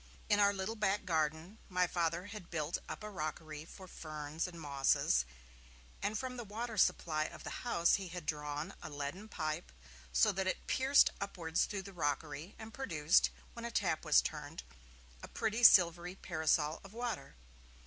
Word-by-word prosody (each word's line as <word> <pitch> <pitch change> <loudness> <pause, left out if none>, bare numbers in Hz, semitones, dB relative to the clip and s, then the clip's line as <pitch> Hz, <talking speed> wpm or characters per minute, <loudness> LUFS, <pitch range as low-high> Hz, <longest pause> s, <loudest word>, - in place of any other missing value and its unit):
In 205 - +4
our 200 0 +6
little 200 +3 -3
back 205 -2 +1
garden, 160 +3 -1
my 180 -1 +3
Father 170 0 -1
had 205 -4 -9
built 160 -1 -2
up - - -6
a 210 - -5
rockery 155 -3 -5
for 185 +2 -11
ferns 155 0 -4
and 170 -2 -9
mosses 135 - +2 0.8
and 210 +1 0
from 255 +1 -4
the 240 - -4
water 220 +2 -5
supply 165 -5 +2
of - - -8
the - - -5
house 170 -9 +3
he 195 -2 -5
had 175 -2 -7
drawn 150 +3 -3
a - - -6
leaden 145 +9 -5
pipe 155 -2 -3 0.4
so - - +5
that 190 0 -1
it 185 - -2
pierced 270 +2 +5
upwards 175 -4 0
through 200 -2 -4
the 195 +1 -10
rockery 150 +1 -2
and 220 0 -9
produced, 165 - +3 0.2
when 235 - -8
a 235 - -2
tap 230 - 0
was - - +5
turned, - - -5 0.6
a - - -7
pretty 220 +1 -1
silvery 175 -3 +7
parasol 160 -3 0
of 195 +1 -12
water. 235 - -4
175 Hz, 170 wpm, -35 LUFS, 155-205 Hz, 0.8 s, silvery